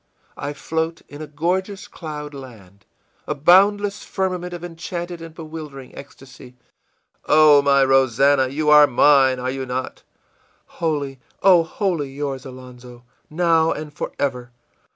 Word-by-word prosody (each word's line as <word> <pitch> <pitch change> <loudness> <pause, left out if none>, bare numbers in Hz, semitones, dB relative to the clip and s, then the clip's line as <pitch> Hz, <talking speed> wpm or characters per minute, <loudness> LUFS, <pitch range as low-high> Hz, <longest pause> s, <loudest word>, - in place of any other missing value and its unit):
I 145 +1 -5
float 160 +3 -4
in 145 +1 -10
a 155 - -7
gorgeous 185 +6 -3
cloud 150 -3 -8
land, 105 -8 -13 0.4
a 150 - -2
boundless 200 +6 +3
firmament 185 -2 -3
of 175 -1 -8
enchanted 175 0 -6
and 165 -1 -11
bewildering 155 -5 -10
ecstasy!î 135 -2 -14 0.8
ìOh, 150 -2 +6
my 140 -1 +4
Rosannah! 135 +1 +3
for - - -5
you 150 +1 0
are 150 -1 +8
mine, 135 0 +4
are 125 +1 -3
you 135 0 -5
not?î 130 +1 -10
ìWholly, 145 -5 -2 0.2
oh, 185 -3 +6
wholly 165 -4 -3
yours, 135 -1 -5
Alonzo, 125 -1 -13 0.3
now 165 0 +2
and 150 -1 -6
forever! 125 -4 -4
150 Hz, 130 wpm, -21 LUFS, 135-165 Hz, 0.8 s, are